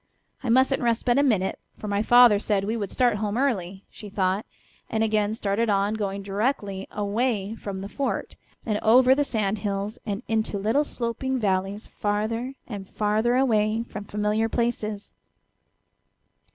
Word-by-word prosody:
I 255 - -3
mustn't 260 +3 +3
rest 235 -2 +1
but 245 +1 +3
a - - +5
minute, 215 -9 +1 0.2
for 210 - -7
my 200 0 0
father 240 -2 +7
said 205 -2 0
we 215 +3 -1
would 205 -4 -3
start 245 -4 +2
home 210 +1 -2
early," 195 -8 -1
she 210 - -10
thought, 195 +1 0 0.4
and 220 0 0
again 215 -1 +1
started 220 +1 0
on, 200 +1 +2
going 200 -2 -3
directly 200 -1 -2
away 210 0 -1
from 200 -3 -6
the 195 +1 -5
fort, 275 +6 -3 0.3
and 215 -2 0
over 250 +4 +6
sand 215 -6 -1
hills 200 +1 -3
and 205 +2 -4
into 220 -2 0
little 225 +9 +1
sloping 260 +1 -2
valleys 195 -1 -1
farther 225 +5 -2
and 200 -5 -7
farther 215 +3 +1
away 225 -4 +2
from 210 -3 -8
familiar 210 +2 0
places. 220 -3 -2
215 Hz, 155 wpm, -25 LUFS, 200-235 Hz, 0.4 s, father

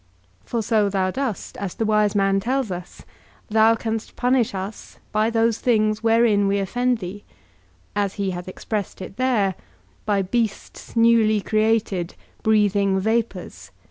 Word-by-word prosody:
For 230 - -2
so 215 -2 +2
thou 190 -1 0
dost, 260 -3 -4
as 195 -3 -5
the 225 - -1
wise 210 -1 +2
man 195 -1 +3
tells 255 +1 -1
us, 180 0 -7 0.5
thou 220 +1 +5
canst 225 0 -4
punish 250 -4 +1
us 195 +3 -7
by 215 +1 +2
those 230 -1 +1
things 215 -3 +1
wherein 225 -3 +3
we 200 +1 +1
offend 245 +5 0
thee; 200 0 -7 0.7
as 200 -1 0
he 200 -2 -1
hath 175 0 -6
expressed 205 +2 -4
it 190 - -9
there, 240 -7 +2 0.5
by 200 -2 +2
beasts 225 +3 -3
newly 230 -2 +4
created, 215 -4 0 0.3
breathing 205 -3 +2
vapours. 225 +3 -2
215 Hz, 140 wpm, -22 LUFS, 195-230 Hz, 0.7 s, thou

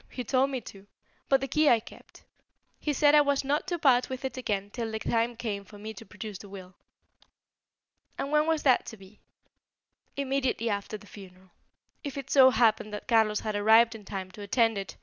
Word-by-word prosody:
He 250 - -6
told 260 +3 +1
me 260 -2 -4
to. 200 -1 -13 0.4
But 270 -1 +4
the 270 - -2
key 305 +3 +3
I 235 - +5
kept. 220 - -16 0.6
He 300 - -1
said 290 +1 +4
I 300 - +7
was 285 -1 +1
not 290 +5 -1
to 350 -2 -2
part 255 -5 +3
with 260 0 -5
it 265 - -4
again 205 -5 -3
till 230 -1 -4
the 220 - -3
time 230 +2 -1
came 215 -4 -4
for 205 +2 -15
me 215 +2 -7
to 225 0 -12
produce 205 -1 -8
the 200 - -12
will." 185 -2 -11 1.4
"And 275 - -4
when 300 +1 +3
was 320 -2 0
that 260 -3 +3
to 225 - -8
be?" 195 +2 -17 1.0
"Immediately 265 -4 -1
after 200 +1 -4
the 210 - -17
funeral, 190 -2 -14 0.5
if 285 -2 -6
it 275 -1 -7
so 265 -2 +7
happened 220 -3 +2
that 210 - -9
Carlos 220 -3 +2
had 215 -1 -3
arrived 220 +3 +5
in 220 -2 -11
time 190 -2 -6
to 205 - -11
attend 225 +2 +1
it. 195 - -7
230 Hz, 210 wpm, -28 LUFS, 205-270 Hz, 1.4 s, I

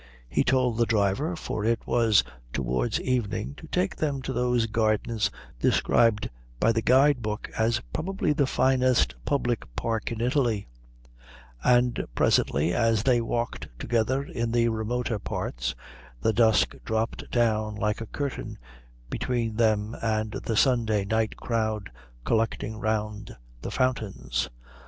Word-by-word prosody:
He - - +1
told 125 -3 +2
the 115 - +3
driver, 110 - +1
for 110 -9 -4
it 115 +1 0
was 115 -4 +4 0.3
towards 60 -2 0
evening, 120 -1 -1
to 160 - -11
take 180 +4 0
them 140 -4 -1
to 130 - -3
those 125 -2 +1
gardens 110 0 +1 0.3
described 115 - +3 0.3
by 115 - +4
the 115 0 0
guide 130 +2 +4
book 105 0 -4
as 115 +1 +1
probably 175 -2 0
the 140 -2 +2
finest 130 - +3
public 120 - 0
park 115 - -2
in 115 - -4
Italy; 120 -4 +1 1.0
and 125 0 +3
presently, 80 +5 +2
as 115 -2 +2
they 125 -2 +3
walked 120 +1 -2
together 120 - 0
in 115 -4 -3
the 120 0 +3
remoter 115 +1 -2
parts, - - -3 0.4
the 110 - +1
dusk 110 -1 +4
dropped 110 0 -2
down 110 -3 +1
like 105 +1 -1
a 115 - -5
curtain 140 +4 -4 0.5
between 115 -3 -1
them 110 -1 +1
and 110 -1 0
the 115 -1 -3
Sunday 110 -6 +3
night 110 +1 0
crowd 110 - -2 0.3
collecting 110 -1 0
round 105 -1 -2 0.2
the - - -4
fountains. 65 - -1
115 Hz, 135 wpm, -27 LUFS, 105-125 Hz, 1.0 s, was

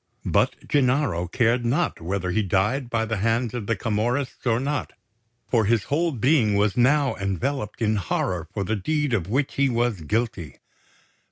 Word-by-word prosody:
But - - 0
Gennaro 130 - +1
cared 120 +5 +1
not 130 - 0
whether 90 +1 -2
he 110 - +1
died 105 +7 0
by 115 -1 0
the 110 0 -2
hands 115 +3 0
of 115 -5 -4
the 115 - +1
Camorrists 120 +6 -2
or 115 -1 +2
not; 140 +2 -2 0.5
for 115 -3 +2
his 110 -1 +2
whole 165 +4 0
being 125 -4 +2
was 100 0 +2
now 135 +3 +3
enveloped 105 - -2
in 110 0 +2
horror 90 -2 -2
for 100 -1 -2
the 110 +4 -1
deed 150 +6 -1
of 95 -7 0
which 135 +5 0
he 140 0 +2
was 120 -6 0
guilty. 95 - -2
115 Hz, 170 wpm, -24 LUFS, 100-130 Hz, 0.5 s, now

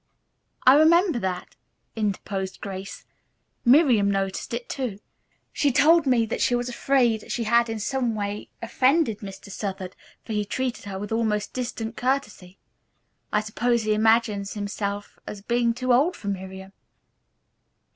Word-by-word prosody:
"I 255 - +9
remember 325 0 +5
that," 185 -3 -4 0.4
interposed 195 -3 -3
Grace. 195 -1 -7 0.6
"Miriam 245 -6 +5
noticed 195 -1 -2
it, 235 +1 -4
too. 250 -8 -3 0.6
She 285 - +2
told 305 +4 +5
me 240 -3 +3
that 225 - -3
she 245 - +3
was 245 0 -1
afraid 245 -3 +1
she 240 -4 -1
had 235 +1 +3
in 225 -1 -3
some 240 +1 -1
way 205 0 -4
offended 255 0 +2
Mr. 195 0 -9
Southard, 190 -2 -5 0.3
for 225 - -5
he 210 -1 0
treated 250 +4 -3
her 195 -1 -5
with 205 +2 -6
almost 220 -2 -1
distant 235 -2 -4
courtesy. 210 -8 -2 0.7
I 210 - +2
suppose 235 +2 0
he 215 0 +1
imagines 215 -2 +2
himself 205 0 -4
as 200 -1 -7
being 235 +1 +1
too 250 +1 0
old 300 +9 +3
for 200 - -6
Miriam." 190 0 -6
225 Hz, 145 wpm, -25 LUFS, 200-250 Hz, 0.7 s, I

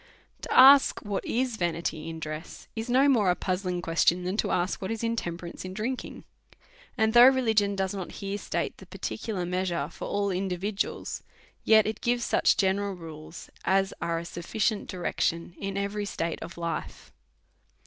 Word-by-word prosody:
To - - -7
ask 270 +2 +7
what 205 -3 -3
is 245 -1 -1
vanity 165 -3 -2
in 165 0 -6
dress, 155 +1 -7
is 225 +2 -4
no 260 +3 +5
more 225 -9 +4
a 180 - +3
puz 185 0 -2
zling 180 -1 -2
question 170 +2 +2
than 185 +2 -2
to - - 0
ask 180 +1 0
wlipt 190 - -4
is 225 0 -3
intemperance 175 -7 -3
in 185 0 -7
drinking; 245 +5 -4 0.7
and 220 -1 +2
though 240 +1 +9
religion 220 -6 +3
does 190 -1 -1
not 190 -3 -6
here 200 +1 -4
state - - -3
the - - -13
particular 195 -6 -4
measure 175 -4 -1
for - - -7
ail 200 -1 0
individuals, 195 +2 -2 0.4
yet 220 -1 +6
it 220 0 -3
gives 240 0 +1
such - - +3
general 195 0 +1
rules 160 -1 -10
as 195 0 +2
are 170 0 -1
a 170 - -5
sufficient 205 +5 -2
direction 170 -1 -2
in 195 0 -4
every 200 +1 -2
state 170 -4 -3
of 170 - -8
life. 170 -2 -5
195 Hz, 170 wpm, -27 LUFS, 175-220 Hz, 0.7 s, though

